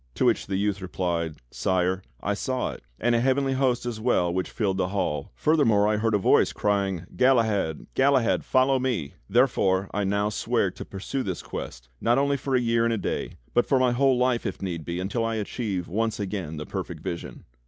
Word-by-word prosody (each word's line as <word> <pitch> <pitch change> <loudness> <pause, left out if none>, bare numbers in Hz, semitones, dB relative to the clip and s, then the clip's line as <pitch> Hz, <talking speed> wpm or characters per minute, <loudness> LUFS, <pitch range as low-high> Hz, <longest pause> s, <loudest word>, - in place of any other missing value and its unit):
'^" - - -38
To - - +1
which - - +2
the 95 - -2
youth 100 0 0
replied: 85 -3 -2 0.2
"Sire, 95 0 0 0.2
I 100 - +1
saw 130 +5 -2
it, - - -10 0.2
and 120 +1 +2
a 115 - +3
heavenly 135 +2 +2
host 130 -2 +1
as 120 -3 -3
well 100 -7 +1
which 95 0 -1
filled 100 -5 -1
the 95 - +1
hall. 75 -7 -2
Furthermore 115 - +3
I 105 0 +2
heard 110 0 +1
a - - +5
voice 95 - +4
crying: 100 -4 0
'Galahad, 110 - +2
Galahad, 130 -3 +3
fol 130 0 +3
low 135 0 +2
me!' 120 - -2 0.2
Therefore 95 0 +2
I 105 - 0
now 100 +2 +1
swear 105 - 0
to - - -9
pursue 100 +7 -4
this 95 -8 -4
Quest, - - -7
not 120 +2 +3
only 140 +1 +2
for 135 -1 -1
a - - +4
year 115 -1 +2
and 115 0 +2
a - - -2
day, - - -3 0.2
but 120 - +3
for 135 - +3
my 130 -1 +3
whole 130 +1 +3
life 125 -1 +1
if - - -4
need 85 -4 -4
be, 85 +1 -3
until 100 +5 -1
I 115 0 -1
achieve 105 -4 -3
once 110 +4 -1
again 95 -6 -4
the 75 - -5
perfect - - -5
vision." 85 - -6
105 Hz, 215 wpm, -26 LUFS, 95-125 Hz, 0.2 s, a